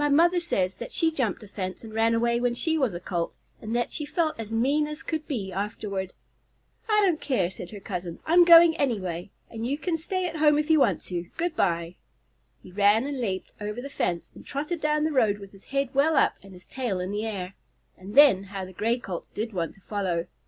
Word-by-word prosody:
My 295 Hz, -, +2 dB
mother 340 Hz, +5 st, +4 dB
says 190 Hz, -, -1 dB
that 240 Hz, -, -7 dB
she 325 Hz, -1 st, +2 dB
jumped 245 Hz, -9 st, -1 dB
a -, -, -11 dB
fence 185 Hz, -1 st, -5 dB
and 220 Hz, -1 st, -9 dB
ran 225 Hz, +1 st, +3 dB
away 235 Hz, +1 st, +2 dB
when 245 Hz, 0 st, 0 dB
she 320 Hz, +6 st, 0 dB
was 260 Hz, -, +1 dB
a -, -, -4 dB
Colt, 175 Hz, -2 st, -3 dB, 0.3 s
and 220 Hz, +1 st, -3 dB
that 240 Hz, 0 st, 0 dB
she 300 Hz, -, -3 dB
felt 310 Hz, +1 st, 0 dB
as 225 Hz, -1 st, -6 dB
mean 275 Hz, +7 st, +2 dB
as 300 Hz, 0 st, -7 dB
could 315 Hz, -2 st, -3 dB
be 210 Hz, -10 st, -3 dB
afterward." 200 Hz, -1 st, -3 dB, 0.8 s
"I 425 Hz, -1 st, +4 dB
don't 340 Hz, -5 st, +1 dB
care," 195 Hz, -11 st, 0 dB
said 180 Hz, -1 st, -8 dB
her 210 Hz, -, -8 dB
cousin, 180 Hz, -3 st, -5 dB
"I'm 345 Hz, +2 st, +6 dB
going 335 Hz, -1 st, +8 dB
anyway, 185 Hz, -10 st, -2 dB, 0.2 s
and 230 Hz, 0 st, -5 dB
you 280 Hz, +3 st, -1 dB
can 330 Hz, +1 st, -1 dB
stay 370 Hz, +3 st, -2 dB
at 325 Hz, -2 st, -5 dB
home 300 Hz, -1 st, +5 dB
if 300 Hz, +2 st, +1 dB
you 315 Hz, -, +6 dB
want -, -, +2 dB
to. 175 Hz, -1 st, -4 dB
Good 335 Hz, 0 st, -1 dB
bye!" 170 Hz, -, 0 dB, 0.7 s
He 185 Hz, -, -12 dB
ran 205 Hz, +5 st, +4 dB
and 280 Hz, -2 st, -3 dB
leaped 190 Hz, -5 st, -3 dB
over 210 Hz, +3 st, -4 dB
the 275 Hz, +3 st, -7 dB
fence, 175 Hz, -10 st, -2 dB
and -, -, -13 dB
trotted 300 Hz, +4 st, -4 dB
down 300 Hz, 0 st, +1 dB
the 315 Hz, -, +1 dB
road 225 Hz, -8 st, +3 dB
with 200 Hz, -1 st, -11 dB
his 195 Hz, -1 st, -17 dB
head 275 Hz, -1 st, -1 dB
well 295 Hz, +4 st, +3 dB
up -, -, +4 dB
and 195 Hz, 0 st, -14 dB
his 180 Hz, -1 st, -14 dB
tail 240 Hz, -8 st, -3 dB
in 180 Hz, +2 st, -3 dB
the 210 Hz, +2 st, -2 dB
air. 190 Hz, -3 st, -4 dB, 0.4 s
And 195 Hz, +4 st, -10 dB
then 270 Hz, -10 st, +7 dB
how 195 Hz, -1 st, -5 dB
the 185 Hz, -, -12 dB
Gray 230 Hz, +6 st, 0 dB
Colt 190 Hz, -8 st, -6 dB
did 220 Hz, +1 st, -3 dB
want 170 Hz, -3 st, -3 dB
to 195 Hz, -, -22 dB
follow! 185 Hz, -5 st, -2 dB
230 Hz, 235 wpm, -26 LUFS, 190-300 Hz, 0.8 s, going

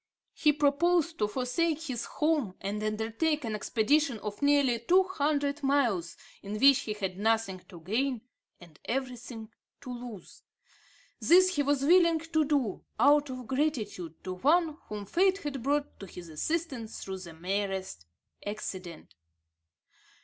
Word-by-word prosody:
He 300 Hz, -, +3 dB
proposed 320 Hz, +3 st, +2 dB
to 210 Hz, -, +2 dB
forsake 285 Hz, +8 st, -1 dB
his 255 Hz, -7 st, -4 dB
home 300 Hz, -, 0 dB
and 205 Hz, +2 st, -3 dB
undertake 225 Hz, +8 st, -1 dB
an 220 Hz, -, -3 dB
expedition 245 Hz, +5 st, +1 dB
of 210 Hz, +2 st, -6 dB
nearly 285 Hz, -4 st, +3 dB
two 360 Hz, +11 st, +4 dB
hundred 295 Hz, -5 st, -1 dB
miles, 245 Hz, -, +1 dB, 0.2 s
in 210 Hz, +1 st, -5 dB
which 275 Hz, +1 st, +7 dB
he 215 Hz, -, -3 dB
had 190 Hz, -3 st, -4 dB
nothing 220 Hz, -3 st, +1 dB
to 170 Hz, -2 st, -11 dB
gain 240 Hz, +7 st, -1 dB, 0.4 s
and 170 Hz, -4 st, -16 dB
everything 245 Hz, -3 st, -4 dB, 0.3 s
to 255 Hz, -3 st, -6 dB
lose. 240 Hz, -5 st, -9 dB, 0.8 s
This 370 Hz, +2 st, +5 dB
he 290 Hz, -, +2 dB
was 285 Hz, -1 st, +1 dB
willing 335 Hz, 0 st, +5 dB
to 320 Hz, 0 st, 0 dB
do, 275 Hz, -9 st, 0 dB, 0.2 s
out 290 Hz, 0 st, +5 dB
of 255 Hz, -1 st, -6 dB
gratitude 225 Hz, -, -2 dB
to 185 Hz, -, -4 dB
one 310 Hz, -, +2 dB
whom 210 Hz, -1 st, -6 dB
fate 380 Hz, -, +2 dB
had 290 Hz, -8 st, -5 dB
brought 285 Hz, +3 st, -1 dB
to 195 Hz, -, -8 dB
his 175 Hz, -1 st, -10 dB
assistance 260 Hz, -, -3 dB
through 190 Hz, -1 st, -5 dB
the 175 Hz, -3 st, -10 dB
merest 190 Hz, -, -3 dB, 0.4 s
accident. 190 Hz, -4 st, -6 dB
250 Hz, 140 wpm, -29 LUFS, 205-295 Hz, 0.8 s, which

